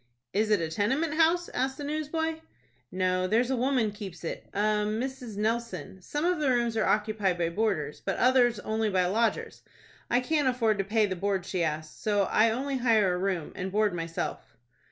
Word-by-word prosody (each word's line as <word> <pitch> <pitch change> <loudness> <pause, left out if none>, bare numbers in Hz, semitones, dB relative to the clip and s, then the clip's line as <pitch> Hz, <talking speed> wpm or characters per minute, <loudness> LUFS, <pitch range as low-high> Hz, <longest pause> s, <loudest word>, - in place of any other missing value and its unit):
"Is 215 +2 +1
it 210 -2 +4
a 165 - -1
tenement 260 - 0
house?" 335 +2 +3
asked 265 +1 -2
the 290 - -6
newsboy. 310 +2 -2 0.5
"No, 185 0 0
there's 235 +5 +2
a - - +2
woman 250 -3 +1
keeps 195 -5 -9
it,—a 170 - -6
Mrs. 215 +3 -1
Nelson. 215 -5 -2
Some 295 - -3
of 355 -2 +1
the 295 -3 +1
rooms 240 -2 +1
are 220 - +1
occupied 210 -3 +1
by 170 -1 0
boarders, 170 -6 -1
but 195 - -2
others 245 -3 +4
only 220 0 -1
by 185 -2 +2
lodgers. 225 +6 0 0.5
I 240 - +3
can't 290 +2 +1
afford 230 -5 +1
to - - +2
pay 215 +2 +2
the 190 -2 -3
board 190 0 -1
she 185 -3 -1
asks; 155 -1 -3
so 205 -2 +2
I 215 +3 +3
only 265 +4 -2
hire 220 -7 +3
a - - -1
room, 185 -4 -2
and 190 0 -4
board 210 -1 +2
my 165 -1 -3
self." 165 -6 -5
215 Hz, 195 wpm, -28 LUFS, 190-255 Hz, 0.5 s, it